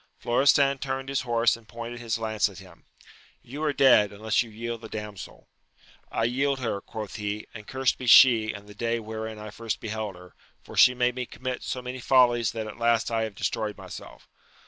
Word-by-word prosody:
Florestan 135 +2 +3
turned 135 0 -4
his 135 -1 0
horse 120 -2 +2
and 115 -2 -16
pointed 120 +1 -7
his 115 -2 -2
lance 110 -1 0
at 95 - -13
him: 95 -1 -15 0.3
— - - -28
^You 140 +5 -7
are 155 -1 +1
dead, 125 -7 +5
unless 105 +1 0
you 120 - -5
yield 115 +1 -5
the 110 - -9
damsel! 105 -2 -8 0.6
I - - -1
yield 135 +4 +1
her, 115 -5 -2
quoth 110 +1 -7
he, 105 0 -4
and 105 -2 -10
cursed 130 -1 0
be 130 - -6
she, 115 -3 +7
and 100 -1 -10
the 105 - -12
day 115 +2 -1
wherein 110 0 -6
I 105 0 -8
first 115 +1 -4
beheld 110 -2 -4
her, 90 -1 -15 0.3
for - - -12
she 125 - +6
made 125 0 +1
me 125 -1 -4
commit 130 -1 -5
so 125 - -4
many 125 +1 -6
follies 120 -3 +4
that 110 -1 -4
at 105 +1 -9
last 115 -1 +2
I 115 -1 +1
have 110 -2 -8
destroyed 105 0 -2
myself. - - -11
115 Hz, 210 wpm, -26 LUFS, 110-125 Hz, 0.6 s, she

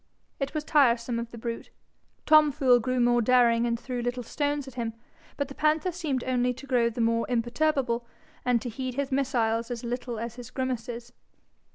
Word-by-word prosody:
It 275 +2 -3
was 305 - -1
tiresome 240 -6 +3
of 235 0 -5
the 235 - -10
brute. 230 0 -5 0.6
Tom 305 -1 +6
Fool 260 -4 +4
grew 255 +2 -1
more 240 0 +4
daring 235 -1 +4
and 235 -1 -1
threw 250 0 -4
little 245 +1 -2
stones 290 +3 -2
at 265 - -9
him, 230 -3 -3 0.4
but 285 - -1
the 275 - -9
panther 310 +5 +1
seemed 310 -8 -2
only 250 -1 0
to 275 - -10
grow 245 -3 +2
the 235 +1 -4
more 230 0 +1
imperturbable, 240 0 0 0.4
and 250 -1 +2
to 245 - -3
heed 255 +2 -5
his 280 0 -2
missiles 235 -4 0
as 240 -1 -5
little 240 0 -4
as 235 +2 -5
his 245 -2 -8
grimaces. 240 -2 -4
245 Hz, 190 wpm, -27 LUFS, 235-275 Hz, 0.6 s, Tom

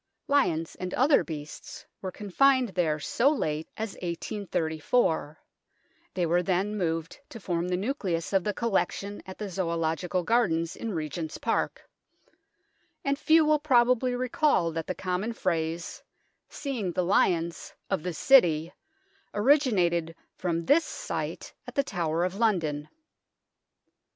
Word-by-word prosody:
Lions 165 - +1
and 185 0 -5
other 275 +4 +4
beasts 150 -2 -8 0.2
were 190 - -4
confined 255 +6 +2
there 165 -5 0
so 235 - +2
late 155 - -2
as 220 -2 -3
1834 170 -2 -1 0.8
(they 180 -2 +1
were 175 +2 +2
then 190 +3 0
moved 165 -4 -2
to 230 - -9
form 175 -3 -2
the 180 0 0
nucleus 190 - -2
of 190 -2 +3
the 210 - 0
collection 205 -2 -1
at 190 - -8
the 210 - -4
Zoological 175 -1 -1
Gardens 175 -7 +1
in 225 - -4
Regent's 160 0 -4
Park), - - -2 1.2
and 280 +1 0
few 315 0 +5
will 305 0 +3
probably 250 -3 +3
recall 250 - +1
that 165 0 -4
the 185 - -2
common 185 +6 -2
phrase, 165 -4 -2 0.2
" - - -47
seeing 240 - -3
the 180 - +1
lions 170 -2 +1
" - - -46
of 195 - +1
the 180 0 -4
City, 170 - +4 0.6
originated 205 - +2 0.2
from 170 -2 -2
this 315 - +5
sight - - -5
at - - -9
the 280 - +3
Tower 170 - -1
of 180 0 -1
London. 165 -9 0
185 Hz, 135 wpm, -28 LUFS, 165-235 Hz, 1.2 s, few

